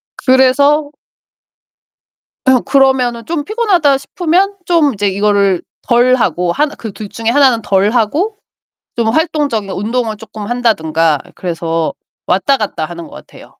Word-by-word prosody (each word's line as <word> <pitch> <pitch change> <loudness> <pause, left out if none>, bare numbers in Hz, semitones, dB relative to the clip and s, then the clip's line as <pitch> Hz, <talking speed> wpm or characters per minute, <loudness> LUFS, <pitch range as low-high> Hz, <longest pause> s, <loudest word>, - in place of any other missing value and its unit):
그래서 280 +3 +3 1.5
아. 260 -1 +5
그러면은 260 -4 +2
좀 325 -3 -2
피곤하다 380 - +2
싶으면 360 +7 0
좀 325 -6 +2
이제 205 0 -1
이거를 200 -2 +1 0.2
덜하고 240 -8 +2
하나 295 - 0
그 220 -3 -7
둘 210 +1 -8
중에 230 0 -3
하나는 255 -3 +3
덜 200 0 +1
하고 300 - 0 0.6
좀 230 -1 0
활동적인 285 - 0
운동을 220 +2 -2
조금 215 -1 -9
한다든가 165 - +1 0.2
그래서 165 -2 -2 0.3
왔다 235 +10 +2
갔다 205 -8 -3
하는 170 0 -8
것 - - -15
같아요. - - -13
240 Hz, 285 characters per minute, -14 LUFS, 200-285 Hz, 1.5 s, 아